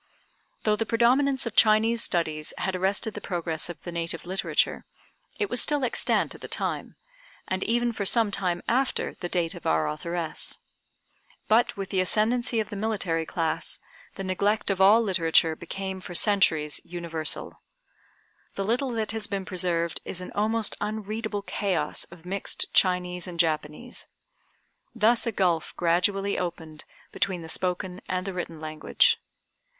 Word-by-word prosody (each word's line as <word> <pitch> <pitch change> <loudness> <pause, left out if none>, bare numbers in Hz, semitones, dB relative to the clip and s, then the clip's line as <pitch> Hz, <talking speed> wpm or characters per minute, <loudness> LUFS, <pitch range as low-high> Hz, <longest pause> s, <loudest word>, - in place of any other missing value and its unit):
Though 215 -1 +3
the 225 +1 -2
predominance 260 +4 +3
of 230 - -4
Chinese 225 +1 +5
studies 155 -6 -1
had 190 0 -1
arrested 195 +4 0
the - - -7
progress 170 -3 -3
of 175 - -8
the 175 - -5
native 165 -1 -2
literature, 190 +2 0 0.5
it 415 - 0
was 245 - +1
still 295 -2 +2
extant 240 - +1
at - - -13
the - - -6
time, - - -3 0.5
and 185 0 -1
even 240 +1 +2
for 215 -3 -3
some 220 +1 +4
time 180 -3 -1
after 260 +3 +1
the 175 - -5
date 175 -1 +1
of 175 - -7
our 80 -1 +2
authoress. 165 - -2 0.9
But 225 +1 +3
with 195 0 -4
the 190 - +1
ascendency 225 +6 +2
of 215 - -2
the - - -4
military 195 -6 0
class, 165 -2 -1 0.4
the 195 - -5
neglect 200 +3 +1
of 190 -1 -1
all 210 +4 +7
literature 165 -4 +3
became 190 +2 -5
for 175 - -8
centuries 165 -7 +2
universal. 165 -2 -1 0.9
The 195 - -1
little 245 +5 +1
that 220 -2 -1
has 220 -2 -4
been 195 -2 -3
preserved 170 -2 -1
is 180 - -3
an 180 - -7
almost 220 +1 0
unreadable 215 0 -3
chaos 200 -2 -1
of 175 -1 -15
mixed 195 +2 -2
Chinese 180 -1 +2
and 175 -2 -7
Japanese. 160 +7 -1 0.9
Thus 230 +2 +3
a - - +1
gulf 180 -6 0
gradually 195 +4 +1
opened 160 -3 -5 0.3
between 180 -3 -1
the - - -8
spoken 180 +1 -1
and 185 0 -1
the 195 - -3
written 170 -3 -5
language. 155 0 +2
190 Hz, 155 wpm, -27 LUFS, 170-215 Hz, 0.9 s, all